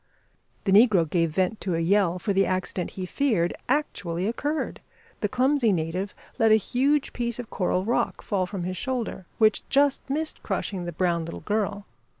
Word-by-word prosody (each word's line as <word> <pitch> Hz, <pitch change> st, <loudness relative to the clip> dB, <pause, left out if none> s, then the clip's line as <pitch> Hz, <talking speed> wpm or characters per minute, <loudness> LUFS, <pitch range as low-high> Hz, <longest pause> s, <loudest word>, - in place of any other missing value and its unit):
The 195 Hz, -, 0 dB
negro 200 Hz, -5 st, +6 dB
gave 165 Hz, +1 st, +1 dB
vent 185 Hz, +6 st, -1 dB
to 185 Hz, -3 st, -1 dB
a -, -, 0 dB
yell, 180 Hz, +1 st, +2 dB
for 200 Hz, +3 st, -1 dB
the 195 Hz, 0 st, +3 dB
accident 185 Hz, -1 st, -2 dB
he 185 Hz, -, -3 dB
feared 185 Hz, -6 st, +1 dB, 0.2 s
actually 200 Hz, -, -1 dB
occurred. 290 Hz, +8 st, -2 dB, 0.4 s
The 210 Hz, -, 0 dB
clumsy 255 Hz, -1 st, +2 dB
native 180 Hz, +3 st, -2 dB, 0.2 s
let 225 Hz, -1 st, +5 dB
a -, -, +8 dB
huge 270 Hz, +7 st, +1 dB
piece 235 Hz, -2 st, -2 dB
of 245 Hz, -2 st, -7 dB
coral 185 Hz, 0 st, 0 dB
rock 235 Hz, -, 0 dB
fall 190 Hz, -3 st, 0 dB
from 190 Hz, -2 st, -5 dB
his 185 Hz, +1 st, -3 dB
shoulder, 235 Hz, -6 st, -3 dB
which 215 Hz, -1 st, +4 dB
just 280 Hz, 0 st, +2 dB
missed 310 Hz, +3 st, -2 dB
crushing 185 Hz, -3 st, -3 dB
the 175 Hz, -, -3 dB
brown 170 Hz, 0 st, 0 dB
little 165 Hz, -, -7 dB
girl. 205 Hz, +1 st, -1 dB
200 Hz, 175 wpm, -26 LUFS, 180-240 Hz, 0.4 s, a